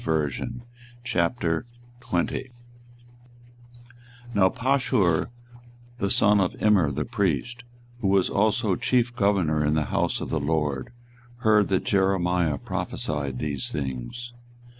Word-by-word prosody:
24:020:001 115 - -2 2.6
Now 95 -2 +4
Pashur 125 - +1 0.7
the 100 - 0
son 105 +1 +4
of 90 - 0
Immer 100 -8 +4
the 75 +2 -2
priest, 115 - -1 0.4
who 105 - -1
was 95 -1 +3
also 105 0 +1
chief 120 +4 +1
governor 95 -8 +2
in 75 +1 +1
the 75 -1 +1
house - - 0
of - - -5
the 80 - +1
LORD, 75 - -1 0.5
heard 105 -3 +4
that 95 -1 0
Jeremiah 90 -5 +1
prophesied 70 -3 -3
these 70 -1 -3
things. 70 - -5
95 Hz, 105 wpm, -25 LUFS, 75-115 Hz, 2.6 s, Now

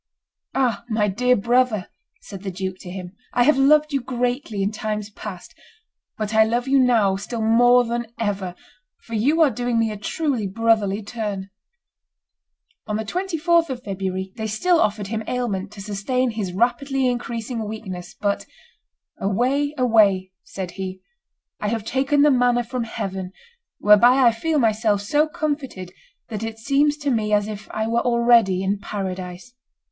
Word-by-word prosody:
"Ah! 250 -5 +1
my 215 -2 +1
dear 250 +6 +2
brother," 235 -2 +1 0.3
said 195 -2 -9
the 195 - -4
duke 185 0 -5
to 180 - -9
him, 180 0 -8 0.2
"I 245 - +5
have 300 +4 +5
loved 300 +2 +4
you 275 - +1
greatly 245 -3 -2
in 200 - 0
times 215 -1 -4
past, 200 -4 -9 0.6
but 215 0 -3
I 220 0 +6
love 240 +3 -1
you 275 0 +4
now 225 -7 +3
still 225 +3 -4
more 245 +2 +5
than 235 0 -3
ever, 195 -5 -2 0.5
for 230 - -11
you 280 +10 +2
are 290 - +4
doing 245 +1 -1
me 225 -1 +1
a 210 - -6
truly 255 -1 -1
brotherly 215 -1 +1
turn." 200 -3 -5 1.4
On 210 - -2
the 220 +1 -2
24th 340 - +1
of 250 -2 -5
February 190 -1 -4
they 220 -1 -3
still 330 - +2
offered 210 -1 0
him 220 +2 -3
aliment 210 -6 -2
to 205 - -9
sustain 215 +6 -1
his 210 -5 -3
rapidly 265 +6 0
increasing 235 -1 -3
weakness 195 -5 -7
but 200 -1 -1 0.7
"Away, 260 +9 0
away," 205 -7 +3
said 185 -2 -6
he; 190 0 -6 0.6
"I 210 - -2
have 220 0 -2
taken 275 +4 +2
the 295 - +6
manna 245 -1 +3
from 240 0 -3
heaven, 190 -4 -5 0.4
whereby 240 +5 +6
I 235 - +7
feel 310 +8 -1
myself 215 -4 +2
so 295 +9 +2
comforted 290 - -4 0.4
that 215 -3 -4
it 225 0 -5
seems 285 +5 +2
to 285 -2 -1
me 215 -3 0
as 205 0 +2
if 210 -1 -7
I 220 - -2
were 230 +1 +1
already 235 -6 +3
in 195 +1 0
paradise. 190 0 -6
225 Hz, 160 wpm, -22 LUFS, 200-250 Hz, 1.4 s, I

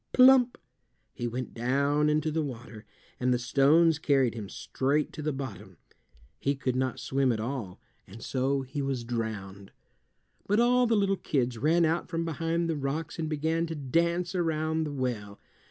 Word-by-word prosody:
Plump! 255 -1 +6 0.6
he 120 - -3
went 125 +1 -5
down 140 +5 +1
into 155 +1 +1
the 160 +1 0
water, 120 -6 -7 0.3
and 125 0 +1
the 125 - +3
stones 145 +6 +4
carried 135 -6 +2
him 105 -4 -7
straight 145 +3 -1
to 155 - -6
the 155 0 -1
bottom. 135 -8 -7 0.6
He 140 +1 0
could 130 -2 -2
not 130 0 -1
swim 135 -1 +1
at 110 - -1
all, 115 -6 -4 0.3
and 110 +4 -11
so 135 +1 0
he 135 +2 -5
was 135 -3 -2
drowned. 105 -5 -5 0.8
But 205 +2 +2
all 245 +1 +4
the 225 -1 +3
little 195 -1 +2
kids 125 -7 -1
ran 165 +5 +3
out 165 +2 0
from 165 -1 -2
behind 165 +1 -1
the 165 - -1
rocks 145 +4 -3
and 160 -1 -2
began 160 +2 0
to 165 - -5
dance 170 +6 0
around 160 -2 0
the 150 - -4
well. 120 -7 -4
140 Hz, 170 wpm, -28 LUFS, 125-165 Hz, 0.8 s, Plump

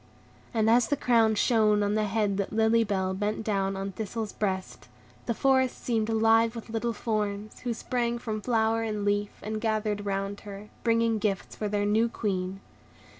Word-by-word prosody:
And 220 -2 +1
as 235 +1 +5
the 290 - 0
crown 225 -4 +3
shone 210 -2 +3
on 205 0 +1
the 215 0 +1
head 205 -1 0
that 200 - -2
Lily 225 +1 +3
Bell 190 -3 -1
bent 210 +3 -2
down 195 -2 0
on 195 +1 -3
Thistle's 215 +2 -4
breast, 190 -3 -3 0.4
the 235 - 0
forest 260 -1 +2
seemed 225 -2 0
alive 225 +1 +3
with 230 0 -8
little 230 +1 -1
forms, 210 -2 -3
who 245 -2 -2
sprang 240 0 -1
from 220 -3 -4
flower 225 -1 +1
and 210 -2 -2
leaf, 205 0 0
and 215 +1 -3
gathered 215 -2 -1
round 195 0 -2
her, 205 0 -9
bringing 230 -1 +2
gifts 200 -2 -2
for 210 - -3
their 205 0 0
new 220 +3 +2
Queen. 195 -4 -3
215 Hz, 175 wpm, -28 LUFS, 205-225 Hz, 0.4 s, as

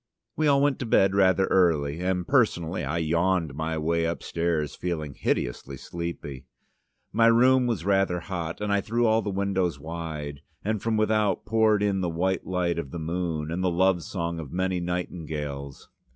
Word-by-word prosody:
We 155 - +1
all 140 -1 +4
went 145 -2 +2
to 125 - -3
bed 95 -3 +4
rather 95 -1 +4
early, 80 -5 +2
and 90 0 -1
personally 100 - +1
I 70 +5 -2
yawned 85 -1 +1
my 80 +2 -2
way 85 +1 0
upstairs, 85 -2 -1
feeling 80 -5 -4
hideously 65 +2 -2
sleepy. 75 -5 -6 0.7
My 115 +2 +5
room 125 +2 +5
was 105 -8 -2
rather 95 -3 +2
hot, 85 0 -5
and 105 -1 0
I 100 - +2
threw 120 +4 0
all 110 0 +3
the 105 - -3
windows 95 -5 -1
wide, 75 -2 -6 0.2
and 110 -1 -1
from 115 -1 0
without 110 -1 +1
poured 110 -2 +3
in 100 -2 +1
the 90 - 0
white 90 +3 -1
light 90 -2 0
of 70 - -5
the 85 - -6
moon, 80 -1 -3
and 90 +2 -2
the 90 - +3
love 90 +1 +2
song 85 -1 -4
of 75 -4 -7
many 95 0 0
nightingales. 75 -6 -5
90 Hz, 175 wpm, -26 LUFS, 80-100 Hz, 0.7 s, My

